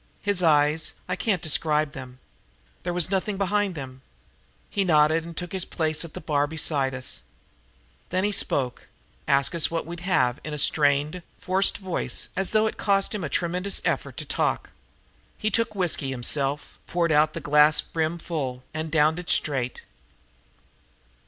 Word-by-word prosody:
His 205 Hz, -3 st, 0 dB
eyes 155 Hz, -1 st, +3 dB
I 180 Hz, -, -1 dB
can't 190 Hz, -2 st, -1 dB
describe 155 Hz, -1 st, +1 dB
them. 130 Hz, -2 st, -9 dB, 0.6 s
There 175 Hz, -, -3 dB
was 175 Hz, +1 st, +1 dB
nothing 195 Hz, +1 st, 0 dB
behind 200 Hz, -1 st, 0 dB
them. 130 Hz, -3 st, -8 dB, 0.7 s
He 200 Hz, -, -1 dB
nodded 155 Hz, -2 st, +3 dB
and 170 Hz, 0 st, -10 dB
took 175 Hz, +1 st, -5 dB
his 190 Hz, -2 st, -1 dB
place 155 Hz, -3 st, -1 dB
at 170 Hz, -, -11 dB
the -, -, -5 dB
bar 145 Hz, -2 st, 0 dB
beside 145 Hz, -4 st, 0 dB
us. 130 Hz, -, -5 dB, 0.9 s
Then 185 Hz, +1 st, 0 dB
he 205 Hz, -, +2 dB
spoke, 130 Hz, -10 st, -1 dB, 0.4 s
asked 140 Hz, +4 st, +2 dB
us 170 Hz, -2 st, +2 dB
what 165 Hz, -1 st, -2 dB
we'd 170 Hz, +1 st, -7 dB
have, 135 Hz, -9 st, +1 dB
in 155 Hz, -1 st, -5 dB
a -, -, -5 dB
strained, 145 Hz, +3 st, +2 dB, 0.2 s
forced 190 Hz, +2 st, +3 dB
voice 190 Hz, -3 st, -1 dB
as 190 Hz, -1 st, +1 dB
though 215 Hz, 0 st, +3 dB
it 220 Hz, -, -2 dB
cost 195 Hz, 0 st, +1 dB
him 205 Hz, -4 st, -3 dB
a 155 Hz, -, -3 dB
tremendous 180 Hz, +5 st, 0 dB
effort -, -, -1 dB
to -, -, -4 dB
talk. -, -, -1 dB, 0.7 s
He 215 Hz, 0 st, -1 dB
took 230 Hz, -1 st, 0 dB
whiskey 175 Hz, -7 st, 0 dB
himself, 135 Hz, +3 st, 0 dB
poured 170 Hz, -2 st, 0 dB
out 150 Hz, +1 st, +3 dB
a -, -, -2 dB
glass 150 Hz, +1 st, +5 dB
brim 160 Hz, +1 st, -2 dB
full, 135 Hz, -7 st, -4 dB
and 155 Hz, 0 st, -4 dB
downed 160 Hz, +1 st, +3 dB
it 180 Hz, -, -7 dB
straight. 130 Hz, -5 st, -1 dB
160 Hz, 165 wpm, -25 LUFS, 145-185 Hz, 0.9 s, glass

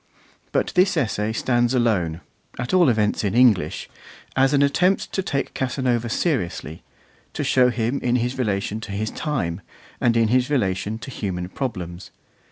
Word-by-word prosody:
But -, -, 0 dB
this 185 Hz, -1 st, +3 dB
essay 110 Hz, -6 st, 0 dB
stands 120 Hz, +2 st, +1 dB
alone, 90 Hz, -9 st, +1 dB, 0.4 s
at 125 Hz, +5 st, -4 dB
all 175 Hz, -6 st, +5 dB
events 105 Hz, -3 st, +1 dB
in 100 Hz, 0 st, -1 dB
English, 120 Hz, -7 st, +3 dB, 0.5 s
as 135 Hz, 0 st, +4 dB
an 140 Hz, -1 st, +4 dB
attempt 180 Hz, +7 st, +2 dB
to 190 Hz, -, -1 dB
take 140 Hz, -7 st, -2 dB
Casanova 125 Hz, -3 st, -1 dB
seriously, 100 Hz, -, -2 dB, 0.5 s
to -, -, -2 dB
show 125 Hz, -1 st, +4 dB
him 120 Hz, +3 st, -1 dB
in 125 Hz, 0 st, 0 dB
his 125 Hz, +1 st, 0 dB
relation 105 Hz, -2 st, -1 dB
to 105 Hz, -2 st, -7 dB
his 110 Hz, +2 st, -2 dB
time, 95 Hz, -, -2 dB, 0.4 s
and 115 Hz, -1 st, +2 dB
in 115 Hz, -1 st, +3 dB
his 125 Hz, +2 st, +2 dB
relation 105 Hz, -5 st, 0 dB
to 125 Hz, -, -9 dB
human 90 Hz, -6 st, -4 dB
problems. 90 Hz, -7 st, -5 dB
120 Hz, 160 wpm, -23 LUFS, 100-130 Hz, 0.5 s, all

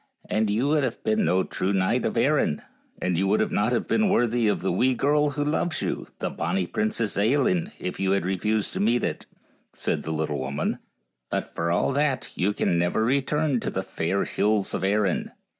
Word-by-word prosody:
" -, -, -34 dB
And 110 Hz, 0 st, +2 dB
3 105 Hz, -, 0 dB
T 115 Hz, -, +1 dB
ou -, -, +1 dB
would 150 Hz, -1 st, +3 dB
have 125 Hz, -3 st, -3 dB
been 110 Hz, 0 st, +2 dB
no 95 Hz, +1 st, +2 dB
true 95 Hz, +2 st, -2 dB
knight 95 Hz, -1 st, +1 dB
of -, -, -1 dB
Erin, 75 Hz, -, +2 dB, 0.4 s
and 90 Hz, -2 st, 0 dB
you 95 Hz, -, +1 dB
would 105 Hz, +2 st, +2 dB
not 105 Hz, +3 st, +1 dB
have 120 Hz, -, 0 dB
been 215 Hz, -2 st, +2 dB
worthy 120 Hz, -, +2 dB
of 105 Hz, -, +1 dB
the 95 Hz, -, +1 dB
wee 125 Hz, +8 st, +2 dB
girl 150 Hz, +3 st, +2 dB
who 145 Hz, 0 st, -2 dB
loves 160 Hz, +2 st, -1 dB
you, -, -, -3 dB
the -, -, -3 dB
bonny 95 Hz, -2 st, -1 dB
Princess 110 Hz, +3 st, -1 dB
Ailinn, 170 Hz, -, +2 dB
if 90 Hz, -, -5 dB
you 95 Hz, -, +1 dB
had 100 Hz, -3 st, 0 dB
refused 105 Hz, +3 st, 0 dB
to -, -, -3 dB
meet 115 Hz, +4 st, +2 dB
it," -, -, -3 dB, 0.5 s
said -, -, -2 dB
the -, -, -7 dB
little 75 Hz, -2 st, -2 dB
woman; 70 Hz, +2 st, -2 dB, 0.2 s
" 60 Hz, 0 st, -54 dB
but -, -, -3 dB
for 85 Hz, 0 st, -1 dB
all 85 Hz, +9 st, +2 dB
that 140 Hz, -2 st, 0 dB
you 95 Hz, +3 st, +1 dB
can 85 Hz, -4 st, 0 dB
never 90 Hz, +6 st, +1 dB
return 140 Hz, +2 st, +1 dB
to -, -, -3 dB
the -, -, -3 dB
fair 95 Hz, +5 st, -1 dB
hills 105 Hz, -1 st, 0 dB
of -, -, -2 dB
Erin. 100 Hz, -1 st, 0 dB
105 Hz, 220 wpm, -25 LUFS, 95-135 Hz, 0.5 s, would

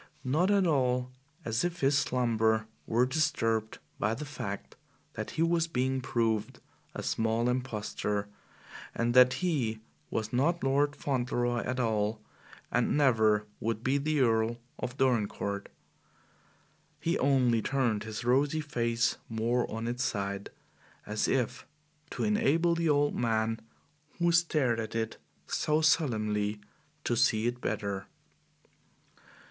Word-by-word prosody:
Not 155 Hz, +9 st, +2 dB
at 200 Hz, -2 st, +4 dB
all 125 Hz, -5 st, +1 dB, 0.3 s
as 115 Hz, +1 st, 0 dB
if 175 Hz, 0 st, -2 dB
his 140 Hz, +1 st, +3 dB
slumber 115 Hz, -5 st, +2 dB, 0.2 s
were 120 Hz, +3 st, +3 dB
disturbed 115 Hz, -6 st, 0 dB, 0.2 s
by 110 Hz, +2 st, +1 dB
the 150 Hz, +5 st, -6 dB
fact 115 Hz, -8 st, -6 dB, 0.4 s
that -, -, -5 dB
he 160 Hz, -, +3 dB
was 165 Hz, 0 st, +2 dB
being 130 Hz, -3 st, 0 dB
proved 115 Hz, -4 st, -1 dB, 0.4 s
a -, -, -4 dB
small 115 Hz, +1 st, 0 dB
impostor 105 Hz, -4 st, -2 dB, 0.7 s
and 120 Hz, 0 st, +1 dB
that 125 Hz, 0 st, +7 dB
he 120 Hz, -11 st, 0 dB, 0.3 s
was 110 Hz, +1 st, -3 dB
not 165 Hz, +8 st, +1 dB
Lord 145 Hz, +2 st, +2 dB
Fauntleroy 120 Hz, -3 st, -1 dB
at 130 Hz, +1 st, -2 dB
all 110 Hz, -2 st, 0 dB, 0.5 s
and 120 Hz, +3 st, +2 dB
never 110 Hz, -7 st, +3 dB
would 115 Hz, 0 st, -2 dB
be 135 Hz, +2 st, +2 dB
the 150 Hz, 0 st, +1 dB
Earl 115 Hz, -1 st, +2 dB, 0.2 s
of 125 Hz, +2 st, -4 dB
Dorincourt. 105 Hz, -6 st, 0 dB, 1.3 s
He 170 Hz, -, 0 dB
only 125 Hz, -4 st, +3 dB
turned 120 Hz, -4 st, 0 dB
his 110 Hz, +1 st, -5 dB
rosy 140 Hz, +5 st, +2 dB
face 120 Hz, -6 st, 0 dB
more 115 Hz, +2 st, 0 dB
on 115 Hz, +1 st, -4 dB
its 120 Hz, +2 st, -1 dB
side, 100 Hz, -5 st, -2 dB, 0.6 s
as 105 Hz, 0 st, -1 dB
if 125 Hz, -2 st, -1 dB, 0.4 s
to -, -, -3 dB
enable 210 Hz, -6 st, +2 dB
the 165 Hz, -1 st, 0 dB
old 145 Hz, 0 st, +3 dB
man 115 Hz, -1 st, 0 dB, 0.6 s
who 170 Hz, 0 st, +2 dB
stared 155 Hz, -8 st, +2 dB
at 110 Hz, 0 st, -5 dB
it 115 Hz, -1 st, -2 dB, 0.3 s
so 150 Hz, +1 st, +1 dB
solemnly 110 Hz, -9 st, +1 dB, 0.4 s
to 120 Hz, -, 0 dB
see 115 Hz, -2 st, +3 dB
it 120 Hz, +1 st, -1 dB
better. 100 Hz, -1 st, -3 dB
120 Hz, 130 wpm, -30 LUFS, 110-140 Hz, 1.3 s, that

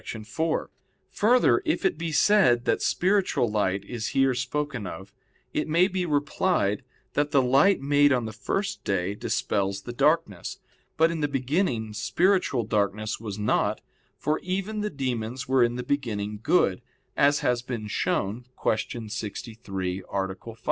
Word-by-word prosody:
4: 155 Hz, +9 st, -3 dB, 0.4 s
Further, 245 Hz, -, +4 dB
if 315 Hz, -, -1 dB
it 190 Hz, -, +2 dB
be 165 Hz, 0 st, -4 dB
said 150 Hz, -, +4 dB
that -, -, +1 dB
spiritual 190 Hz, -8 st, +2 dB
light 100 Hz, -2 st, 0 dB
is 115 Hz, -1 st, -4 dB
here 135 Hz, -1 st, +4 dB
spoken 125 Hz, -2 st, -3 dB
of, 95 Hz, +2 st, -9 dB, 0.4 s
it 150 Hz, -, -1 dB
may 170 Hz, +4 st, +4 dB
be 185 Hz, -2 st, -2 dB
replied 145 Hz, -, +1 dB, 0.3 s
that 145 Hz, 0 st, +1 dB
the 145 Hz, -2 st, +4 dB
light 135 Hz, +10 st, +4 dB
made 145 Hz, +1 st, +4 dB
on 125 Hz, -3 st, +1 dB
the 110 Hz, -, -6 dB
first 195 Hz, -, -3 dB
day 95 Hz, 0 st, 0 dB
dispels 100 Hz, -1 st, -1 dB
the 120 Hz, -, -6 dB
darkness. 140 Hz, -, +1 dB, 0.4 s
But 165 Hz, +1 st, +4 dB
in 165 Hz, -, -3 dB
the 145 Hz, -, +1 dB
beginning 130 Hz, -, -1 dB
spiritual 170 Hz, -, +1 dB
darkness 105 Hz, 0 st, -1 dB
was 105 Hz, -3 st, -6 dB
not, 105 Hz, 0 st, +1 dB, 0.4 s
for 155 Hz, +1 st, 0 dB
even 195 Hz, +4 st, -3 dB
the 210 Hz, -, -1 dB
demons 125 Hz, -, -3 dB
were 130 Hz, -1 st, +4 dB
in 120 Hz, 0 st, +1 dB
the 125 Hz, -, -4 dB
beginning 105 Hz, -6 st, -2 dB
good, 100 Hz, -, +2 dB, 0.3 s
as 145 Hz, +1 st, +3 dB
has 125 Hz, -1 st, +1 dB
been 120 Hz, -3 st, -5 dB
shown 105 Hz, +2 st, -1 dB
(Q. 110 Hz, +1 st, -1 dB
63, 105 Hz, -4 st, -5 dB
A. 100 Hz, -1 st, 0 dB, 0.2 s
5). 115 Hz, -1 st, -9 dB
125 Hz, 155 wpm, -26 LUFS, 105-155 Hz, 0.4 s, Further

